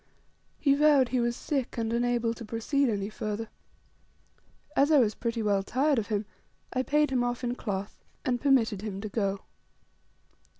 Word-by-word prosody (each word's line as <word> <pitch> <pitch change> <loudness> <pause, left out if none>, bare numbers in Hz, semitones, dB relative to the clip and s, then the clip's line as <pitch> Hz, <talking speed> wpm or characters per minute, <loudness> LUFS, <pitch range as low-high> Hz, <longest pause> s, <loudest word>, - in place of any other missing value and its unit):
He 280 - +3
vowed 285 -3 +4
he 255 - +1
was 240 0 0
sick, 265 -3 -3
and 225 0 -1
unable 240 -1 +1
to 230 - -9
proceed 235 +5 0
any 200 -2 -1
further. 215 +1 -4 1.3
As 280 +2 +4
I 305 - +7
was 225 -5 +4
pretty 230 0 -2
well 200 -2 +2
tired 270 +6 +1
of 210 - -4
him, 210 -1 -1 0.5
I 255 - +1
paid 295 +2 +2
him 250 -2 +2
off 245 +1 -2
in 245 0 0
cloth, 200 -5 -4 0.3
and 245 -2 0
permitted 240 -8 +3
him 205 -3 -5
to 215 - -5
go. 200 -2 -1
235 Hz, 170 wpm, -28 LUFS, 215-260 Hz, 1.3 s, I